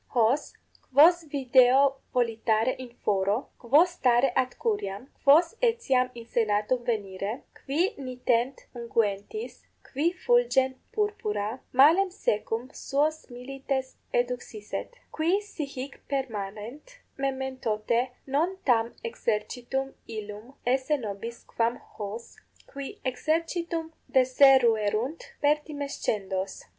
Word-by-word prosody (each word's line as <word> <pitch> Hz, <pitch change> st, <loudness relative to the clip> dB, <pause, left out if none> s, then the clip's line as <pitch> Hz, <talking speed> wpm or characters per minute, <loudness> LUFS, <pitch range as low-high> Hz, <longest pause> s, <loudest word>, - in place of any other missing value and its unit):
Hos, 240 Hz, +5 st, +2 dB, 0.4 s
quos 330 Hz, +5 st, +6 dB
video 270 Hz, 0 st, +4 dB
volitare 225 Hz, -1 st, +1 dB
in 255 Hz, -1 st, -7 dB, 0.2 s
foro, 200 Hz, +4 st, +1 dB
quos 295 Hz, +9 st, +4 dB
stare 250 Hz, -5 st, +3 dB
ad 255 Hz, -1 st, 0 dB
curiam, 260 Hz, -, -2 dB, 0.2 s
quos 315 Hz, +5 st, +6 dB
etiam 365 Hz, -, +2 dB
in 235 Hz, -1 st, -9 dB
senatum 225 Hz, +1 st, 0 dB
venire, 205 Hz, -1 st, -3 dB
qui 335 Hz, -, -1 dB
nitent 250 Hz, -1 st, -1 dB
unguentis, 235 Hz, -, -2 dB, 0.2 s
qui 300 Hz, +6 st, 0 dB
fulgent 365 Hz, -, +2 dB, 0.2 s
purpura, 225 Hz, -, -2 dB
mallem 320 Hz, +9 st, +6 dB
secum 225 Hz, -, -1 dB
suos 305 Hz, +3 st, -1 dB
milites 265 Hz, +1 st, -4 dB
eduxisset: 245 Hz, -, -3 dB, 0.2 s
qui 335 Hz, +5 st, +1 dB
si 410 Hz, -7 st, -6 dB
hic 275 Hz, 0 st, -7 dB
permanent, 245 Hz, -, -5 dB, 0.2 s
mementote 260 Hz, -3 st, -1 dB, 0.2 s
non 320 Hz, +8 st, 0 dB
tam 235 Hz, -2 st, +2 dB
exercitum 240 Hz, +4 st, -2 dB, 0.2 s
illum 215 Hz, +3 st, -7 dB
esse 265 Hz, +4 st, +2 dB
nobis 230 Hz, 0 st, -6 dB
quam 235 Hz, +1 st, -1 dB
hos, 215 Hz, +2 st, -8 dB, 0.3 s
qui 280 Hz, -1 st, -8 dB
exercitum 325 Hz, +4 st, -1 dB, 0.2 s
deseruerunt, 255 Hz, -1 st, +3 dB
pertimescendos. 280 Hz, -10 st, -1 dB
255 Hz, 95 wpm, -27 LUFS, 225-290 Hz, 0.4 s, quos